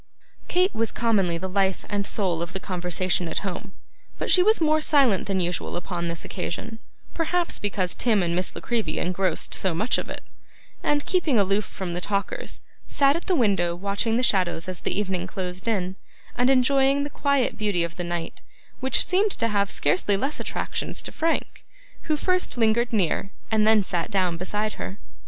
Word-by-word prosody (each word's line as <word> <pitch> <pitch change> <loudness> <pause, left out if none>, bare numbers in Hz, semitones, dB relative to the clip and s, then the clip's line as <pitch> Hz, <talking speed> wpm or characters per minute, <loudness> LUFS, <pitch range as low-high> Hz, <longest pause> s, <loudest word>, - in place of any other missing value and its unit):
Kate 365 +2 +2
was 225 0 0
commonly 195 -8 +1
the 190 +3 -4
life 190 0 0
and 205 -1 -1
soul 180 -6 0
of 170 +1 -4
the 190 - -3
conversation 180 -1 -1
at 165 - -3
home; 195 +1 -5 0.4
but - - -2
she 365 - +6
was 435 +4 +4
more 310 -1 +3
silent 275 - +3
than 195 -1 0
usual 175 -1 -2
upon 175 -1 -3
this 170 -1 -3
occasion 220 +5 -5 0.3
(perhaps 345 +1 0
because 190 -3 -1
Tim 215 -6 +2
and 170 0 0
Miss 180 +1 0
La - - -6
Creevy 235 -2 -1
engrossed 185 +1 -1
so 185 -4 0
much 215 +8 +1
of - - -6
it), - - -6 0.6
and, 290 0 +1
keeping 335 -9 +2
aloof 200 0 +2
from 185 -3 -5
the 175 - -3
talkers, 205 - -3 0.3
sat 280 0 +3
at 335 - -4
the 370 - +3
window 195 - +2
watching 200 +5 0
the 250 - +1
shadows 180 -7 +1
as 185 -2 -4
the - - -2
evening 185 -3 -2
closed 185 +1 -5
in, 190 -4 0 0.4
and 245 +1 +3
enjoying 270 +1 +4
the 290 - -5
quiet 280 -3 +1
beauty 205 -5 0
of 170 0 -4
the 175 - -4
night, 170 -1 -4 0.4
which 265 0 +2
seemed 390 +4 +3
to 230 - 0
have 200 -2 +1
scarcely 185 +7 +1
less 275 +8 -2
attractions - - -2
to - - -5
Frank, 330 +1 -1 0.5
who 305 - +3
first 365 -3 0
lingered 235 +1 +2
near, 195 -2 +1 0.2
and 215 -1 +3
then 220 -2 +5
sat 175 -1 -2
down 185 -5 +1
beside, 210 +5 -2
her. 190 - -6
200 Hz, 190 wpm, -25 LUFS, 180-250 Hz, 0.6 s, she